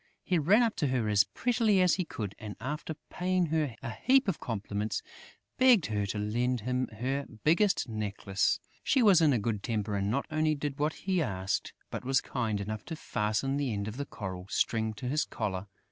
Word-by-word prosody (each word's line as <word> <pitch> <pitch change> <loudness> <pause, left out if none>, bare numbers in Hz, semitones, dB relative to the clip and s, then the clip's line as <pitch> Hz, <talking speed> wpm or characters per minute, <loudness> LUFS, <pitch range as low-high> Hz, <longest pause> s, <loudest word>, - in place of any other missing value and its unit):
He 180 -2 +1
ran 200 +11 +5
up 225 -2 +1
to 150 - +1
her 125 -4 0
as 105 -1 +5
prettily 225 -5 +2
as 180 -1 +5
he 185 - 0
could 105 -9 -5
and, 105 -1 -7
after 150 +6 -4 0.2
paying 185 0 +1
her 150 -7 0
a 120 - -3
heap 265 - +3
of 195 - 0
compliments, 105 -2 -3 0.6
begged 250 -9 +6
her 105 -2 -1
to 100 - -3
lend 120 +4 0
him 125 +3 -1
her 130 +5 -3 0.2
biggest 175 0 +3
necklace. 105 -3 0 0.2
She 265 -3 +3
was 195 -6 +7
in 155 -3 +5
a 125 - +3
good 105 -1 -1
temper 105 -2 -2
and 100 0 0
not 135 +6 0
only 155 0 +2
did 145 0 -4
what 150 +2 +1
he 185 -2 +2
asked, 95 -8 -2 0.2
but - - -4
was 135 +1 +3
kind 110 -5 -2
enough 105 +1 -4
to 160 - -5
fasten 110 +2 -1
the 140 -4 0
end 100 -1 -2
of 110 +3 -6
the 140 - -3
coral 95 -3 -6
string 110 -1 0
to 125 - -5
his 150 +4 +1
collar. 95 -1 -3
125 Hz, 205 wpm, -30 LUFS, 105-160 Hz, 0.6 s, was